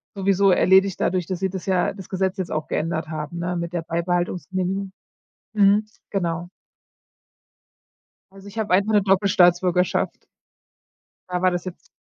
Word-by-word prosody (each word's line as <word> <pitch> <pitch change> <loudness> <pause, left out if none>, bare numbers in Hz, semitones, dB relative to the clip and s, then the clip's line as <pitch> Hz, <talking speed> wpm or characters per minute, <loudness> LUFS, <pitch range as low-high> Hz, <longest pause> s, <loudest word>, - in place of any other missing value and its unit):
sowieso 195 0 +2
erledigt 190 +1 +4
dadurch, 180 -2 0
dass 185 -2 -3
sie 190 0 0
das 190 0 -7
ja, 185 -1 +1
das 190 -3 -11
Gesetz 190 +1 -1
jetzt 185 -3 -4
auch 155 0 -2
geändert 160 0 -2
haben, 155 +2 -5
ne, 175 +1 -2
mit 170 0 -3
der 175 -2 -3
Beibehaltungsgenehmigung. 180 +3 -2 0.6
Mhm, 205 +1 +4 0.2
genau. 175 -3 -2 1.8
Also, 195 +1 -14
ich 220 - -7
hab 215 -3 -2
einfach 200 +4 +3
'ne 210 - +4
Doppelstaatsbürgerschaft. 185 -2 +2 1.1
Da 180 0 -2
war 185 - +3
das 175 0 -3
jetzt 185 -1 -9
185 Hz, 145 wpm, -23 LUFS, 175-195 Hz, 1.8 s, erledigt